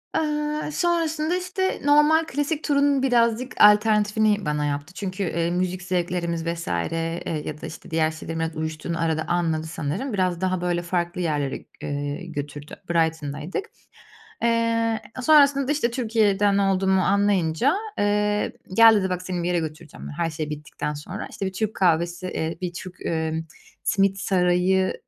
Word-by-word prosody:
Eee, 300 0 -1
sonrasında 330 -1 0
işte, 370 +1 -2
normal 300 +2 +5
klasik 290 +3 -2
turunun 280 -2 +2
birazcık 240 0 +2
alternatifini 210 0 +4
bana 150 0 0
yaptı 145 +4 -3
çünkü, 195 0 -4
eee, 170 -1 -1
müzik 180 +1 -1
zevklerimiz 175 -2 -1
vs. 170 0 -3
eee, 165 - -2
ya 150 0 -6
da, - - -6
işte, 165 +2 -11
diğer 160 -1 +2
şeylerin 160 +1 -6
artık 165 -1 -3
uyuştuğunu 160 +2 -3
arada 160 -1 0
anladı 165 -3 0
sanırım. 165 - -3
Biraz 185 -2 0
daha 185 -1 0
böyle 175 -1 0
farklı 175 +1 -2
yerlere, 145 -5 -2 0.2
eee, 145 +4 -4
götürdü, 145 -2 -6
Brighton'daydık. 160 - -1 0.8
Eee, 230 -1 +1 0.2
sonrasında, 280 -1 +5
işte, 265 -6 0
Türkiye'den 210 -4 +2
olduğumu 190 -1 +2
anlayınca, 200 - +2 0.2
eee, 210 0 +1 0.2
gel 225 +1 +8
dedi, 190 -2 +1
"Bak 180 0 -2
seni 180 -2 -3
bir - - -1
yere 175 -1 +1
götüreceğim," 155 0 -7
yani, - - -7
her 170 -1 0
şey 155 -1 -4
bittikten 150 0 -5
sonra. 180 +8 -6
İşte, 195 - -5
bir 190 - -3
Türk 220 +2 -2
kahvesi, 175 0 +1
eee, 160 -2 -3
bir 175 -1 -3
Türk, 180 +1 -8
eee, 160 0 -2 0.4
Simit 195 0 +2
Sarayı 185 0 +2
185 Hz, 150 wpm, -24 LUFS, 165-225 Hz, 0.8 s, gel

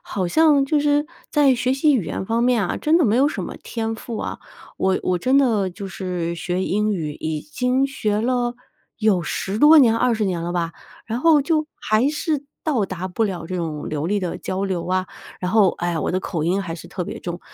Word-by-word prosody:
好 190 -3 -3
像 295 - +4
就 295 +2 +1
是 295 0 +2 0.2
在 290 -4 +4
学 250 +1 0
习 285 +2 +3
语 225 -9 +1
言 160 - -4
方 230 +1 +1
面 240 -4 +3
啊， - - -2
真 315 +2 +3
的 335 - +3
没 220 -1 +3
有 275 +3 +4
什 - - -4
么 - - -7
天 225 -1 -3
赋 225 -1 -6
啊。 - - -4 0.4
我 190 0 +1
我 180 -1 0
真 260 +9 +3
的 220 -8 +2
就 200 +2 -7
是 180 -3 -3
学 175 +2 -2
英 210 +2 +1
语， 160 -6 -3
已 155 0 -3
经 250 - 0
学 215 -6 -1
了 245 0 0 0.4
有 215 -5 +2
10 195 +5 -3
多 300 +4 +8
年 230 -5 +5
20 230 -2 +1
年 180 -3 -1
了 175 - -3
吧， 170 -2 -1 0.3
然 230 +2 -3
后 315 -1 +5
就 310 +1 0
还 220 +6 +2
是 300 -1 -2 0.2
到 270 -10 +1
达 185 -1 -5
不 205 +5 -2
了 180 -5 -4
这 185 - -5
种 155 -4 -4
流 150 +1 -2
利 205 +2 +1
的 180 -2 -3
交 190 +1 -3
流 185 -3 -2
啊。 185 0 0 0.3
然 180 - -2
后， 210 -3 +5
唉， 175 -1 -1
我 - - -1
的 185 - 0
口 165 -5 -3
音 180 +4 +1
还 170 -3 -5
是 165 - -10
特 180 - -4
别 - - -6
重。 175 0 -5
210 Hz, 235 characters per minute, -22 LUFS, 180-255 Hz, 0.4 s, 多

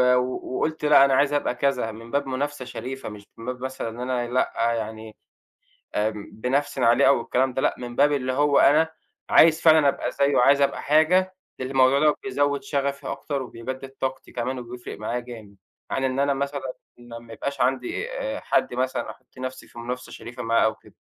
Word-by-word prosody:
و 125 0 -2
وقُلت: 155 -1 -2
"لأ، 145 -2 +7
أنا 135 - +2
عايز 140 +2 +3
أبقى 145 -4 0
كذا،" 125 -3 0
من 115 +2 -11
باب 140 0 0
منافسة 135 +1 -3
شريفة، 130 -1 -6
مش 105 -1 -11
من 115 - -10
باب 125 0 -5
مثلًا 130 -3 -4
إن 115 +2 -10
أنا 125 -1 -1
لأ، 115 -2 +1
يعني 110 -1 -5 0.8
آمم، 105 0 -2
بانَفسَن 130 +3 -1
عليه 115 +1 +5
أو 120 - +4
الكلام 130 +2 0
ده 130 - -1
لأ، - - +1
من 120 -1 -7
باب 145 +1 +4
اللي 130 -2 -1
هو، 145 +1 +3
أنا، 155 +3 +5 0.4
عايز 160 0 +6
فعلًا 155 -3 +6
أبقى - - -2
زيَّه، 140 0 +2
عايز 140 +3 +5
أبقى 140 - +1
حاجة، 180 +5 +3 0.2
لأن 130 0 -4
الموضوع 135 +1 +4
ده 150 0 +4
بيزوِّد 145 -7 0
شغفي 140 0 -2
أكتر، 140 -2 -3
وبيجدِّد 130 +3 -7
طاقتي 130 0 -4
كمان، 125 +2 -3
وبيفرق 120 0 -8
معايا 120 +3 -2
جامد، 115 -5 -11 0.4
عن 135 - -1
إن 130 0 0
أنا 140 0 +2
مثلًا، 140 -1 -3 0.2
ما 120 -1 -10
ما 115 -1 -12
يبقاش 140 +3 -4
عندي، 130 - -1
آآ، - - -3
حد - - 0
مثلًا، 130 +1 -2
أحُط - - -22
نَفْسي 130 0 -6
في - - -12
منافسة 125 +2 -5
شريفة 120 +1 -8
معاه، 115 0 +3
أو 110 - +1
كده. - - -20
130 Hz, 195 wpm, -24 LUFS, 120-140 Hz, 0.8 s, لأ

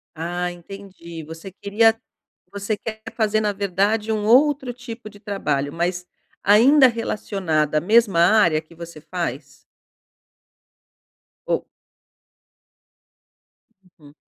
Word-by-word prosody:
Ah, 175 +2 -3
entendi, 175 -2 -10
você 165 +5 -10
queria 220 +4 +2 0.5
você 200 +2 -3
quer 220 0 -7
fazer, 215 -1 +1
na 210 -1 0
verdade, 200 +3 0
um 210 -1 -1
outro 265 +2 +3
tipo 235 -2 -9
de 205 -1 -16
trabalho, 145 -10 -2
mas 175 +2 -2 0.4
ainda 255 +8 +6
relacionada 190 -9 -1
à 150 - +1
mesma 210 -2 +3
área 170 -4 +4
que 160 +2 -19
você 170 -2 -10
faz? 145 -5 -5 1.9
Ou - - -1 2.4
Uhum. 145 -1 -17
200 Hz, 105 wpm, -22 LUFS, 170-220 Hz, 2.4 s, ainda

